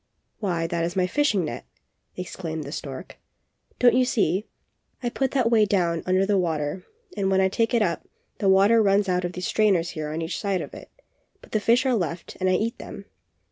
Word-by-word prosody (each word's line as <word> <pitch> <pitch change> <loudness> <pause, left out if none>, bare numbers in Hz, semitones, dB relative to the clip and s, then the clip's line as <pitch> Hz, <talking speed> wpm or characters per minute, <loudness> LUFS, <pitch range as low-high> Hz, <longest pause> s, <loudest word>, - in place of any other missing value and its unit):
"Why, 175 -5 -1
that 165 0 -1
is 175 +2 -2
my 185 -1 +2
fishing 205 - +1
net!" 120 - -5 0.5
exclaimed 165 -3 -5
the 140 - -8
stork. 140 +3 -7 0.6
"Don't 245 -2 +5
you 255 - +4
see? 205 -5 0 0.6
I 240 - 0
put 265 +2 -1
that 250 -3 +1
way 220 -2 +5
down 175 -5 +1
under 185 +1 +3
the 200 -1 +2
water 160 0 -2 0.3
and 195 -1 0
when 190 0 +3
I 190 0 +3
take 225 +4 0
it 230 - +3
up, 170 -4 -2 0.3
the 195 - +2
water 200 +4 +5
runs 200 -1 +3
out 180 -1 0
of 175 - -4
these 180 0 -4
strainers 190 -6 +2
here 155 -1 -5
on 160 +2 -3
each 165 - -4
side 195 -3 -1
of - - -8
it, - - -11 0.5
but - - -17
the 215 - +1
fish 235 +5 +3
are 260 - +2
left 175 -5 -3
and 185 -1 +1
I - - +3
eat 225 +6 -1
them. - - -9
190 Hz, 215 wpm, -25 LUFS, 170-215 Hz, 0.6 s, Don't